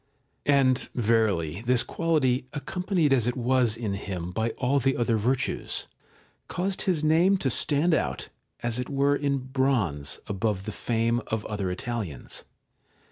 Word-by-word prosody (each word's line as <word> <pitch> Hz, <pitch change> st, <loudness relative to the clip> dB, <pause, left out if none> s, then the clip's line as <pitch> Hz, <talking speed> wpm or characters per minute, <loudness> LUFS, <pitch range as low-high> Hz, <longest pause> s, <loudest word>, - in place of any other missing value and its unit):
And 135 Hz, -2 st, +3 dB
verily 105 Hz, -7 st, +1 dB
this 125 Hz, 0 st, +2 dB
quality, 135 Hz, -7 st, +1 dB
accompanied 175 Hz, 0 st, 0 dB
as 120 Hz, -3 st, +3 dB
it 125 Hz, -, -1 dB
was 125 Hz, -2 st, +2 dB
in 110 Hz, -4 st, -2 dB
him 90 Hz, -3 st, -4 dB
by 110 Hz, +5 st, 0 dB
all 135 Hz, +2 st, +2 dB
the 135 Hz, +1 st, +1 dB
other 120 Hz, -1 st, +2 dB
virtues, 125 Hz, +5 st, -1 dB, 0.6 s
caused 190 Hz, +2 st, -1 dB
his 160 Hz, -4 st, +1 dB
name 170 Hz, +6 st, +4 dB
to 135 Hz, -8 st, 0 dB
stand 150 Hz, +7 st, +2 dB
out, -, -, -1 dB, 0.3 s
as 120 Hz, 0 st, -1 dB
it 125 Hz, -, -3 dB
were 140 Hz, 0 st, +2 dB
in 140 Hz, -1 st, 0 dB
bronze, 130 Hz, -, 0 dB
above 100 Hz, -1 st, -2 dB
the 110 Hz, -, -3 dB
fame 115 Hz, +2 st, 0 dB
of 110 Hz, -1 st, -2 dB
other 100 Hz, -3 st, -2 dB
Italians. 95 Hz, -, -4 dB
125 Hz, 145 wpm, -27 LUFS, 110-140 Hz, 0.6 s, name